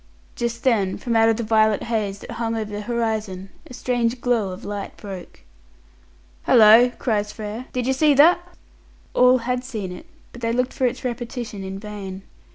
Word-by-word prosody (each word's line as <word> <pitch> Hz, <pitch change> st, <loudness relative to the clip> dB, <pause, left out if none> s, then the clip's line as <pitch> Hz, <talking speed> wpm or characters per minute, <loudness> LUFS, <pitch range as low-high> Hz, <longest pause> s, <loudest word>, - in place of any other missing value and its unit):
Just 235 Hz, 0 st, -3 dB
then, 205 Hz, -7 st, +2 dB
from 235 Hz, -2 st, -2 dB
out 225 Hz, 0 st, +5 dB
of 225 Hz, -, +2 dB
the 235 Hz, -, -2 dB
violet 215 Hz, -1 st, +3 dB
haze 215 Hz, -4 st, -2 dB
that -, -, -9 dB
hung 230 Hz, -1 st, -2 dB
over 215 Hz, -2 st, -4 dB
the 205 Hz, 0 st, -4 dB
horizon, 215 Hz, -5 st, -3 dB, 0.2 s
a -, -, -12 dB
strange 245 Hz, -1 st, -1 dB
glow 235 Hz, -5 st, +1 dB
of 185 Hz, +4 st, -8 dB
light 205 Hz, -1 st, -6 dB
broke. 190 Hz, -, -9 dB, 1.0 s
"Hallo," 225 Hz, +1 st, +7 dB
cries 210 Hz, -3 st, -1 dB
Frere, 215 Hz, +4 st, -7 dB
"did 250 Hz, -1 st, -2 dB
you 265 Hz, -, +2 dB
see 290 Hz, +2 st, +3 dB
that?" 320 Hz, +6 st, +6 dB, 0.7 s
All 250 Hz, +1 st, +5 dB
had 250 Hz, +1 st, -2 dB
seen 215 Hz, -8 st, -5 dB
it, 315 Hz, -, -10 dB, 0.2 s
but 240 Hz, -, -12 dB
they 230 Hz, 0 st, 0 dB
looked 250 Hz, +1 st, 0 dB
for 260 Hz, -2 st, +1 dB
its 245 Hz, +1 st, -4 dB
repetition 240 Hz, -4 st, -5 dB
in 190 Hz, 0 st, -6 dB
vain. 195 Hz, -2 st, -7 dB
225 Hz, 180 wpm, -22 LUFS, 210-245 Hz, 1.0 s, Hallo